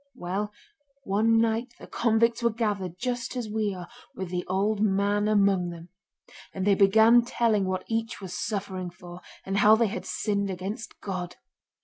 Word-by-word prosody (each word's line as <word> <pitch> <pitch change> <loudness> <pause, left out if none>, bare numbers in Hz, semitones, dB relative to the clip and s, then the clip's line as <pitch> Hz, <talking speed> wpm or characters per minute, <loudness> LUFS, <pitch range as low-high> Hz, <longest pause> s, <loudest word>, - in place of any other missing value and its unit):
Well, 195 +4 -3 0.5
one 225 +1 +2
night 230 +2 0
the - - -10
convicts 230 0 +1
were 235 - +3
gathered 205 -6 -2
just 245 +2 -3
as 245 -3 -3
we 210 -2 -1
are, 180 -1 -8 0.3
with 190 -2 -5
the 180 -1 -2
old 200 +3 0
man 205 0 +2
among 200 -4 +3
them. 170 0 -10 0.7
And 190 -1 -2
they 205 - +5
began 220 +5 +6
telling 230 -4 +1
what 185 0 -2
each 225 0 -3
was 190 -3 -7
suffering 195 -3 -3
for, 175 0 -12 0.2
and 195 +1 -1
how 215 +2 +7
they 230 +1 +2
had 215 +1 -4
sinned 200 -2 -1
against 190 +4 -6
God. 180 -3 -4
205 Hz, 165 wpm, -27 LUFS, 190-225 Hz, 0.7 s, how